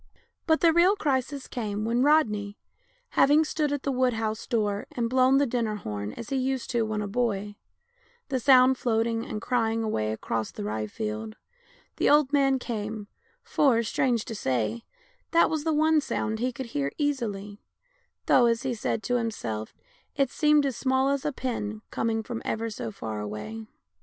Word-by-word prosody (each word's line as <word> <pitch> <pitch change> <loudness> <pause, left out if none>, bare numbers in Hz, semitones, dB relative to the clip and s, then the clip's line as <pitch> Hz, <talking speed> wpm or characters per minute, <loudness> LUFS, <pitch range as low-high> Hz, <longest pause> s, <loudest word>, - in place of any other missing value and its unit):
But 320 -1 +3
the 330 -1 +5
real 355 +4 +5
crisis 275 - -1
came 215 -3 -3
when 235 +2 +1
Rodney, 215 -9 +2 0.5
having 295 +3 +4
stood 305 -1 -1
at 285 -2 -2
the 280 - 0
wood 255 -1 +2
house 220 -1 -3
door 210 -4 -1
and 235 -1 -1
blown 260 +2 +4
the 285 - +3
dinner 230 -4 -1
horn 105 - -5
as 230 - -8
he 270 - +1
used 260 -1 -1
to 240 - +1
do 225 - +2
when 215 -1 -2
a - - -3
boy, 205 -2 -1 0.7
the 265 -2 0
sound 255 0 +5
floating 230 -1 0
and 215 - -5
cry 230 -3 +1
ing 225 0 -1
away 110 - -1
across 110 0 -3
the - - -7
rye 105 +1 -2
field, 215 - -5 0.6
the - - +2
old 295 -1 +4
man 275 -2 +4
came 215 -4 -5 0.2
— - - -39
for, 245 -6 +4
strange 235 0 0
to 230 - -6
say, 115 - -1 0.4
that 335 -1 +4
was 310 -1 -2
the 320 - +2
one 310 0 +3
sound 220 -5 -2
he 250 +2 0
could 255 +2 -6
hear 140 -1 -1
easily, 215 -8 -2 0.6
though, 245 -2 +5
as 230 +2 +1
he 260 -2 -1
said 225 -1 -2
to 245 - +1
himself, 110 - -4 0.4
it 275 -3 +1
seemed 300 -1 +3
as 270 -3 -1
small 265 +2 +1
as 280 -1 -1
a 295 - +1
pin, 220 -5 -4
coming 225 -1 -1
from 230 0 -5
ever 225 0 -2
so 210 - -5
far 110 - -5
away. 105 +1 -6
230 Hz, 185 wpm, -27 LUFS, 210-270 Hz, 0.7 s, the